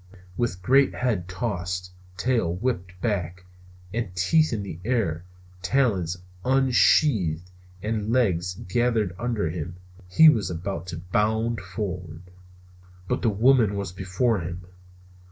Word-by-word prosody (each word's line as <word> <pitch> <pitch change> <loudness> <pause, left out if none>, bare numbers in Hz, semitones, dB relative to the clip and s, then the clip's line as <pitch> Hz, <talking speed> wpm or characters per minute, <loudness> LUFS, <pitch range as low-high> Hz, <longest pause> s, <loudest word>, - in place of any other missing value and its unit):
With 90 -6 -2
great 135 +5 +4
head 110 -8 -1
tossed, 90 -3 -3 0.3
tail 115 -5 +1
whipped 90 -4 -3
back, 90 -5 -2 0.5
and 105 -6 -3
teeth 155 - +3
in 110 -4 -2
the 85 -4 -7
air, 95 -8 -1 0.4
talons 95 -6 +1 0.3
unsheathed 120 - +3 0.3
and 110 0 -2
legs 90 -8 +1
gathered 110 -1 0
under 115 -9 -1
him, 85 +1 -5 0.3
he 160 - +7
was 110 -11 +4
about 90 0 -4
to 85 -1 -5
bound 110 +6 0
forward. 90 -3 -6 0.8
But - - -1
the 115 - +3
woman 110 0 +4
was 100 -2 -3
before 95 +5 0
him! 85 +1 -6
100 Hz, 120 wpm, -25 LUFS, 90-120 Hz, 0.8 s, he